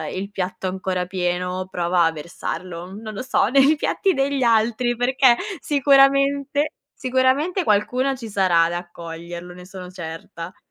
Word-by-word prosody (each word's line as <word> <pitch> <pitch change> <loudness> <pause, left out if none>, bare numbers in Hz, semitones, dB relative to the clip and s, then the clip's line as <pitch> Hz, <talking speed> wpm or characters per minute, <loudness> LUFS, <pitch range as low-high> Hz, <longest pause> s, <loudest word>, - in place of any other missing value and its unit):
il 195 +2 -5
piatto 190 -1 -4
ancora 185 -1 -2
pieno, 180 0 -2
prova 175 -1 +1
a 165 - +2
versarlo, 170 +2 -6
non 215 +1 -8
lo 205 - -5
so, 255 - +1
nei 275 +4 +5
piatti 385 +5 0
degli 275 0 0
altri 235 +1 +2
perché, 245 0 +4 0.2
sicuramente 280 +1 +3 0.3
sicuramente 260 +8 +1
qualcuno 250 +4 +1
ci 240 -3 -8
sarà 185 -5 +3
ad 165 +1 0
accoglierlo, 175 0 -7
ne 180 0 -12
sono 185 -1 -9
certa. 165 0 -8
200 Hz, 140 wpm, -22 LUFS, 180-265 Hz, 0.3 s, nei